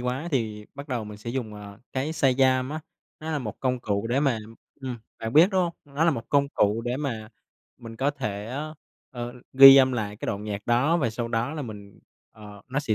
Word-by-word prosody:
quá 125 +7 -3
thì 110 -6 -2
bắt 140 +1 -9
đầu 120 -4 -2
mình 105 0 -9
sẽ 115 +2 -6
dùng, 120 -4 -4
à, 100 -1 -10
cái 140 +4 -2
Shazam 130 -3 +2
á, 155 +1 -4 0.4
nó 160 +1 -5
là 150 - 0
một 110 -6 -6
công 125 -2 0
cụ 100 -1 -1
để 125 +4 +1
mà 135 -6 +1 0.4
ừm, 130 -2 -4 0.2
bạn 115 0 -4
biết, 160 +6 +7
đúng 190 -2 +2
hông? 170 -1 -1 0.2
Nó 160 - +3
là 170 - +5
một 115 -6 -5
công 140 -1 +2
cụ 105 -4 +1
để 125 +1 -1
mà 115 -7 -4 0.5
mình 115 -1 -10
có 135 +3 +1
thể, 110 -8 -4
ơ, 145 +6 -5 0.4
ờ, 120 -1 -6 0.2
ghi 135 +1 +11
âm 130 -1 +5
lại 105 -4 -3
cái - - -6
đoạn 105 -1 -3
nhạc 100 -1 -5
đó 125 +8 +3
và 135 -9 0
sau 115 +1 -4
đó 115 +6 -1
là 155 - -4
mình, 105 -4 -10 0.3
ờ 105 -2 -13
nó 135 +3 -1
sẽ 115 -7 0
125 Hz, 230 wpm, -26 LUFS, 110-140 Hz, 0.5 s, ghi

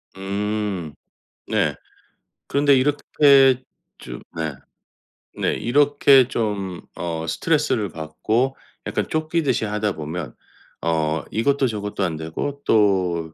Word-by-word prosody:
음. 100 -4 -3 0.5
네. - - +1 0.7
그런데 140 0 +4
이렇게 135 -1 +4 0.4
좀 - - -8
네. 80 -2 -2 0.8
네, - - 0
이렇게 140 0 +4
좀 100 -7 -3
어 80 -2 -4
스트레스를 130 - 0
받고 110 +12 -1 0.3
약간 - - -2
쫓기듯이 155 -5 0
하다 105 -1 -1
보면 80 -2 -6 0.5
어 80 -1 0
이것도 135 +4 +1
저것도 105 -3 -3
안되고 80 - -3
또 90 -6 +2
105 Hz, 200 characters per minute, -22 LUFS, 85-135 Hz, 0.8 s, 그런데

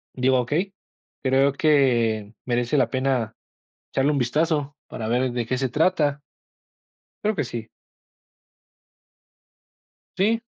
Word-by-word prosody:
Digo: 130 0 +3
"Okey, 165 +11 -1 0.5
creo 135 +1 +3
que 120 -8 +2
merece 120 +3 0
la 125 -4 +3
pena 130 -4 0 0.6
echarle 135 +2 +2
un 145 - 0
vistazo 145 +2 0
para 110 - -5
ver 125 +2 +1
de 120 -1 -2
qué 130 - 0
se 130 0 -1
trata". 150 0 +1 1.0
Creo 215 0 +1
que - - 0
sí. 115 -2 -6 2.5
Sí. 225 +4 +2
130 Hz, 115 wpm, -24 LUFS, 120-150 Hz, 2.5 s, Digo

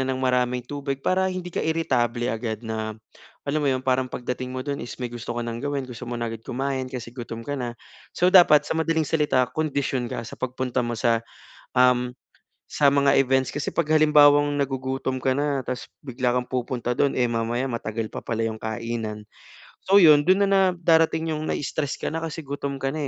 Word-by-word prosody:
ng 130 - 0
maraming 125 -1 +1
tubig, 140 0 -4
para 190 +1 +2
hindi 180 -1 -5
ka - - -1
iritable 120 -7 0
agad 110 0 -4
na 110 -1 -3 0.5
alam 150 +2 0
mo 140 - +2
'yon, 130 0 -2
parang 130 0 +2
pagdating 125 +1 -4
mo 130 0 -5
do'n 140 -1 -2
is 120 - -7
may 125 - -2
gusto 120 -1 -7
ka 120 - -2
ng 115 0 -4
gawin, 145 -2 -2
gusto 125 0 -10
mo 120 - -3
na 120 - -2
agad 115 -1 -6
kumain 130 +1 -3
kasi 120 -2 -7
gutom 115 -2 -7
ka 145 - -2
na. 120 -3 -4 0.4
So, 180 +2 +3
dapat 160 -5 +7
sa - - -2
madaling 160 -1 +1
salita, 145 -5 +2
kondisyon 140 -5 -1
ka 115 - -4
sa - - -8
pagpunta 125 0 -2
mo 120 -1 -3
sa, 115 -2 +2 0.6
um, 125 -1 +4 0.6
sa 145 - +3
mga 140 -1 +4
events 130 0 +2
kasi 145 -1 -3
'pag - - 0
halimbawang 145 -1 +5
nagugutom 130 -1 -2
ka 130 - +1
na 145 -1 0
tapos 125 - -4 0.2
bigla 125 -1 0
kang 125 - -1
pupunta 125 -1 -2
do'n, 140 -1 +2
eh 125 - +3
mamaya 115 +2 -1
matagal 115 -2 -3
pa - - -5
pala 115 0 -1
'yong 110 -1 -3
kainan. 110 -1 -4 0.6
So, 195 - +4
'yun 150 -4 +7
dun 190 +2 +5
na - - +2
na 195 -1 +5 0.2
darating 160 -1 +3
'yung 155 0 -3
na-i-stress 145 0 -2
ka - - -3
na 165 - -2
kasi 165 0 -4
gutom 140 0 -4
ka 135 - -2
na 150 -2 -3
130 Hz, 205 wpm, -24 LUFS, 120-145 Hz, 0.6 s, dapat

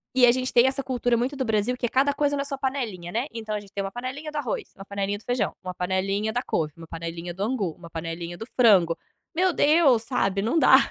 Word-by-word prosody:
e 255 -1 +7
a 240 - +7
gente 255 +1 -2
tem 240 +1 +6
essa 265 +1 +1
cultura 245 -2 0
muito 250 +5 -1
do 265 - -1
Brasil 220 +1 +1
que 250 - -2
é - - 0
cada 275 +3 +3
coisa 285 0 +1
na 280 - -1
sua 280 -1 -2
panelinha 240 -11 -3
não 225 - 0
é? 260 - -2
Então 220 -2 -5
a 210 - -1
gente 200 -1 -15
tem 200 - -2
1 195 - -4
panelinha 260 +6 -5
do 300 - -5
arroz, 260 -7 -3
1 195 - -9
panelinha 200 0 -2
do 210 - -18
feijão, 245 -4 0
1 185 -1 -5
panelinha 195 +4 0
da 245 +2 -1
couve, 155 -10 -1
1 165 -1 -11
panelinha 165 +1 -6
do 190 +3 -3
angu, 215 -6 -1
1 170 +1 -13
panelinha 165 +1 -5
do 225 - -6
frango. 190 -9 +5 0.4
Meu 365 +2 +3
Deus 290 -7 +4
sabe, 200 -6 0
não 230 +10 +1
dá. - - +8
225 Hz, 260 wpm, -25 LUFS, 190-260 Hz, 0.4 s, dá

